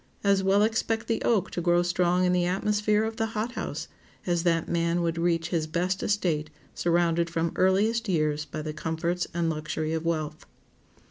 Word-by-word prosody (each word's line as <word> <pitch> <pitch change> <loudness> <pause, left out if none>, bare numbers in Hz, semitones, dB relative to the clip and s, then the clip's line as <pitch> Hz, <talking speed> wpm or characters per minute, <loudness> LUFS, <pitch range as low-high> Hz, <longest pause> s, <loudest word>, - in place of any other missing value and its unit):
As 200 -1 +3
well 195 +2 +3
expect 225 0 0
the 225 - -1
oak 220 -5 +1
to 175 - -3
grow 175 0 +3
strong 180 +1 +2
in 180 - +2
the 175 -1 +2
atmosphere 210 +3 +1
of 220 0 -3
the 225 -2 0
hot 225 +3 -1
house 250 - -5 0.4
as 175 -2 +1
that 165 -2 +1
man 170 0 0
would 165 0 -1
reach 165 -1 +1
his 160 -3 -1
best 180 +4 -1
estate 165 -7 0 0.2
surrounded 170 -1 +1
from 165 0 -1
earliest 210 +4 +2
years 155 -3 +1
by 155 0 -6
the 155 0 -4
comforts 165 +3 -2
and 170 0 -1
luxury 155 0 -2
of 160 0 -2
wealth. 155 -2 -3
175 Hz, 185 wpm, -27 LUFS, 165-195 Hz, 0.4 s, As